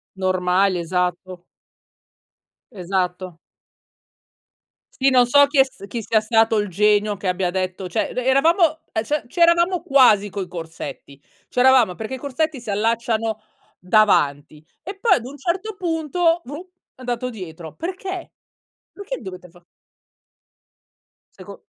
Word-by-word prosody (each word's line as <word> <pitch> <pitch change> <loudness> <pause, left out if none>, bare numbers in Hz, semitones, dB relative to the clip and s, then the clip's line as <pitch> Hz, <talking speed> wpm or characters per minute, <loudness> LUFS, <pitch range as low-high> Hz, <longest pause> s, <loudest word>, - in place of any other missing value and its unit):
Normali, 185 0 +1
esatto. 180 +1 -3 1.3
Esatto. 180 -3 -3 1.5
Sì, 270 0 +2
non 250 -2 +5
so 285 +3 +6
chi 285 -1 0
è - - +9
s 265 -6 -15
chi 230 +2 -5
sia 220 0 +1
stato 225 0 +2
il 205 -2 -1
genio 210 +2 +2
che 195 - -5
abbia 180 -1 0
detto 185 0 -3
cioè - - -2
re 250 - -3
eravamo 320 +4 +3
e 220 - -1
cioè, 295 +4 -2
c'eravamo 340 +3 +3
quasi 245 - +4
coi 195 -2 -5
corsetti, 165 -4 -9 0.3
c'eravamo 250 -7 +4
perché 220 +4 -6
i - - -3
corsetti 285 +1 -3
si 225 - -9
allacciano 225 +1 -1 0.4
davanti, 155 -7 +1 0.2
e 390 +4 -7
poi 460 +3 +3
ad 235 - -4
un 280 +3 -9
certo 375 +8 -3
punto, 335 0 0
vruh, 290 +5 -7 0.3
è 255 - -17
andato 245 0 -3
dietro. 170 -7 -9
Perché? 375 +3 -6 0.6
Perché 405 +5 -6
dovete 185 -4 -10
fa 175 0 -22 1.7
Seco - - -12
220 Hz, 130 wpm, -21 LUFS, 185-285 Hz, 1.7 s, è